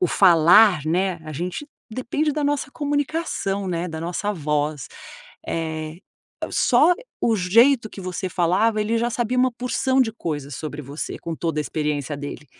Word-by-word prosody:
o 365 - +3
falar, 175 -1 +6
né, 180 +1 0
a 155 - -7
gente 180 - -4 0.2
depende 285 +6 -1
da 300 0 -2
nossa 285 -1 -1
comunicação, 290 - -2
né, 175 0 -2
da 160 -1 -6
nossa 180 +5 -2
voz. 150 -4 -2 0.6
Eh, 160 -1 -3 0.5
só 305 +9 +4 0.3
o 230 - +2
jeito 230 +6 +4
que - - -9
você 185 0 -4
falava, 195 +6 +1
ele 220 +2 0
já 240 +1 0
sabia 240 +1 -1
uma 255 0 +4
porção 250 +2 0
de 225 -4 +2
coisas 145 - -5
sobre 150 0 -6
você, 140 +3 -6
com 165 -1 -5
toda 160 -2 -2
a - - 0
experiência 150 -2 -2
dele. 145 +1 -7
185 Hz, 160 wpm, -23 LUFS, 155-240 Hz, 0.6 s, falar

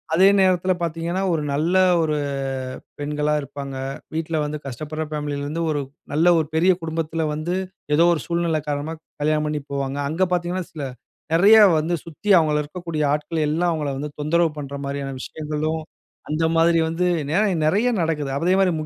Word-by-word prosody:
அதே 190 +3 +6
நேரத்துல 185 -1 +3
பார்த்தீங்கன்னா, 170 +3 -2
ஒரு 155 -2 0
நல்ல 165 +6 +1 0.3
ஒரு 155 -2 0 0.8
பெண்களா 150 +1 0
இருப்பாங்க. 140 -1 -7 0.4
வீட்ல 160 -1 -1
வந்து 150 0 -4
கஷ்டப்படுற 155 +5 -4
ஃபேமிலில 145 -1 -3
இருந்து 165 +3 -2
ஒரு 145 -1 0 0.3
நல்ல 170 +3 +5
ஒரு 155 - -1
பெரிய 180 +3 +5
குடும்பத்துல 160 0 -2
வந்து, 170 +4 -2 0.4
ஏதோ 165 +2 +5
ஒரு 150 - -4
சூழ்நிலை 170 -2 0
காரணமா, 145 +3 -2 0.3
கல்யாணம் 155 0 +1
பண்ணிப் 145 -2 -4
போவாங்க. 140 0 -2
அங்க 180 +4 +1
பார்த்தீங்கன்னா, 175 0 -1
சில 150 -3 -5 0.5
நிறைய 205 +6 +7 0.2
வந்து 170 +3 0
சுத்தி 170 +6 -7
அவங்கள 150 -1 +1
இருக்கக்கூடிய 160 0 -4
ஆட்கள் 150 +1 -1
எல்லாம் 170 +3 +1
அவங்கள 150 -3 -2
வந்து 150 0 -4
தொந்தரவு 165 +2 +2
பண்ற 140 0 -6
மாரியான 140 -1 -4
விஷயங்களும், 155 +1 -3 0.5
அந்த 160 +2 +1
மாரி 165 0 +4
வந்து 180 +2 0 0.3
நிறைய 205 0 +3
நிறைய 215 +9 +2
நடக்குது. 150 -4 -1
அதே 180 +3 +2
மாரி, 185 -2 +3
160 Hz, 160 wpm, -22 LUFS, 150-170 Hz, 0.8 s, நிறைய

